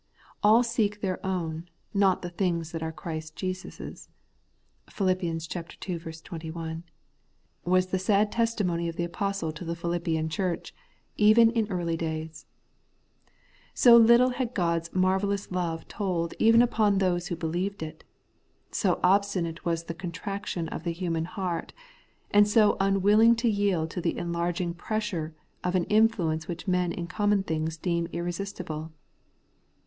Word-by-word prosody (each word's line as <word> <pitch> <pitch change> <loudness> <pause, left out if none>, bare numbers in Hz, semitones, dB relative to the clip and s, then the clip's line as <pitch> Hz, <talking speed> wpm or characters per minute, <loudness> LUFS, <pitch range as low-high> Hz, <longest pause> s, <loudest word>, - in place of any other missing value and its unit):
' - - -28
All 220 +4 +6
seek 210 -3 0
their 185 -2 -2
own, 175 -3 -3 0.2
not 195 -2 +3
the 175 - -5
things 170 -3 -1
that 165 - -5
are 160 - -2 0.5
Jesus 185 0 -5
Christ's' - - -9 0.8
(Phil. 195 -2 0
ii. 180 -3 0 0.9
21), 165 0 -6 0.8
was 185 +1 +3
the 185 0 -2
sad 205 +2 +2
testimony 200 -8 0
of 165 - -6
the 170 - -2
apostle 195 -1 -2
to 155 +3 -8
the 170 0 -3
Philippian 170 -2 -1
church, 175 +2 -2 0.4
even 220 +2 +6
in 225 -3 0
early 175 -3 -1
days: 160 -2 -5 1.3
so 240 -2 +8
little 235 +2 +7
had 250 -1 -3
God's 170 -2 0
marvellous 190 +2 0
love 170 -3 -2
told 180 -5 -2
even 230 +1 +6
upon 215 -4 +2
those 175 -2 +1
who 175 - -2
believed 175 +3 -3
it; 155 0 -8 0.7
so 185 -4 +1
obstinate 185 -3 +1
was 165 -1 0
the 170 - -5
contraction 180 0 -4
of - - -6
the 170 -1 -1
human 165 -2 -2
heart, 180 -2 -4 0.6
and 205 0 +6
so 210 0 +4
unwilling 205 +4 +5
to 235 +1 0
yield 200 -7 +1
to 180 - -4
the - - -1
enlarging 170 0 -2
pressure 175 -5 -3 0.3
of 180 +1 0
an 180 - +3
influence 195 -8 +2
which 175 +3 -6
men 180 -1 +1
in 170 - -4
common 205 +2 +1
things 160 -2 -2
deem 170 0 -1
irresistible. 170 -2 -4
180 Hz, 145 wpm, -27 LUFS, 170-200 Hz, 1.3 s, so